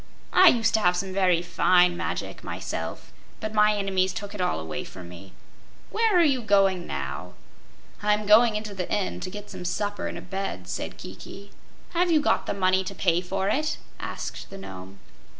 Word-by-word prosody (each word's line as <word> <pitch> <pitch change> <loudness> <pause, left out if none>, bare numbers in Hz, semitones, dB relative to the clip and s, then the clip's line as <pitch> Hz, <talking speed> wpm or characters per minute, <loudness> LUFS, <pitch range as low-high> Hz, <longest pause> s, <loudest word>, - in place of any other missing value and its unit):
"I 370 - +8
used 225 -6 +4
to 220 - +4
have 180 -3 +3
some 190 +1 -3
very 180 -3 +3
fine 180 0 +4
magic, - - -4
myself, - - -5 0.3
but 215 -1 -4
my 210 0 +4
enemies 190 -2 +1
took 205 +1 -6
it 205 - -4
all 80 - 0
away 80 -2 -5
from 90 -2 -10
me. 90 +2 -12 0.6
Where 440 -3 +3
are 345 - +6
you 275 -5 +2
going 195 -4 +3
now?" 70 - -5 0.7
"I'm 210 0 +1
going 215 +2 +6
into 210 -1 -4
the 185 -2 -4
inn, 205 -2 -1
to 185 - -5
get 205 +2 -9
some - - -7
supper 205 +3 -2
and - - -5
a - - -7
bed," 190 - -4
said - - -5
Kiki. 200 +1 -10 0.4
"Have 355 +1 +2
you 320 -2 +5
the 290 - +1
money 185 -1 +2
to - - -6
pay 175 -2 +2
for 190 +1 -2
it?" 310 +8 0 0.2
asked - - -6
the 195 - -9
Nome. 95 - -9
195 Hz, 185 wpm, -26 LUFS, 180-215 Hz, 0.7 s, I